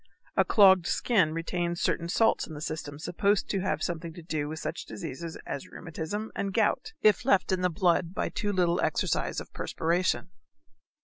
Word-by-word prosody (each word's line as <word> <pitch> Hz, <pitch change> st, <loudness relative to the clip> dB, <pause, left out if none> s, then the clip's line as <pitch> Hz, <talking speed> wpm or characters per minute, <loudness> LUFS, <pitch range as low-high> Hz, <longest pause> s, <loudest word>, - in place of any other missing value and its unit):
A -, -, +5 dB
clogged 190 Hz, -4 st, +6 dB
skin 185 Hz, -10 st, +2 dB
retains 170 Hz, +1 st, -2 dB
certain 170 Hz, 0 st, 0 dB
salts 225 Hz, +5 st, +2 dB
in 160 Hz, -, -8 dB
the -, -, -6 dB
system 155 Hz, -2 st, -5 dB
supposed 200 Hz, +6 st, +1 dB
to 195 Hz, -, 0 dB
have 190 Hz, -, -1 dB
something 170 Hz, -1 st, -3 dB
to 170 Hz, -, -10 dB
do 155 Hz, -3 st, -2 dB
with 160 Hz, -, -5 dB
such 165 Hz, -, -5 dB
diseases 165 Hz, +2 st, -6 dB
as 140 Hz, -, -5 dB
rheumatism 180 Hz, +6 st, -5 dB
and 195 Hz, -1 st, -3 dB
gout 330 Hz, -, +1 dB
if 215 Hz, +2 st, +5 dB
left 195 Hz, -7 st, +3 dB
in 185 Hz, -1 st, +1 dB
the 180 Hz, -, +2 dB
blood 170 Hz, 0 st, +2 dB
by -, -, -1 dB
too 205 Hz, -2 st, -2 dB
little 180 Hz, -2 st, +2 dB
exercise -, -, 0 dB
of -, -, -10 dB
perspiration. 175 Hz, +3 st, -1 dB
175 Hz, 180 wpm, -28 LUFS, 165-195 Hz, -, clogged